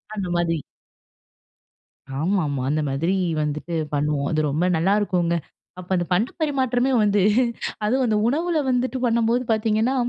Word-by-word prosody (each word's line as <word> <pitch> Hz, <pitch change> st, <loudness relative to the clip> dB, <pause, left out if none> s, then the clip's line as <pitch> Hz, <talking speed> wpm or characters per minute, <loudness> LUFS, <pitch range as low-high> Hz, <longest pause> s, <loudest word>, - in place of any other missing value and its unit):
அந்த 195 Hz, -3 st, -3 dB
மாதிரி. 170 Hz, -1 st, +1 dB, 1.6 s
ஆமாமா, 155 Hz, -6 st, 0 dB
அந்த 155 Hz, +2 st, +1 dB
மாதிரி 165 Hz, +8 st, 0 dB, 0.3 s
வந்துட்டு 150 Hz, +3 st, -3 dB, 0.2 s
பண்ணுவோம். 145 Hz, -1 st, 0 dB
அது 155 Hz, -, +1 dB
ரொம்ப 155 Hz, +5 st, 0 dB
நல்லாருக்குங்க, 180 Hz, -1 st, +1 dB, 0.4 s
அப்ப 180 Hz, -, -11 dB
அந்த 175 Hz, -1 st, 0 dB
பண்ட 210 Hz, +7 st, +1 dB
பரிமாற்றமே 265 Hz, -3 st, +1 dB
வந்து 205 Hz, -1 st, +3 dB, 0.6 s
அதுவும் 255 Hz, +4 st, +2 dB
அந்த 215 Hz, -2 st, +1 dB
உணவுல 325 Hz, +5 st, +1 dB
வந்துட்டு 255 Hz, +1 st, 0 dB
பண்ணம்போது 235 Hz, +1 st, +2 dB
பாத்தீங்கன்னா, 220 Hz, +3 st, +1 dB
200 Hz, 125 wpm, -23 LUFS, 165-245 Hz, 1.6 s, வந்து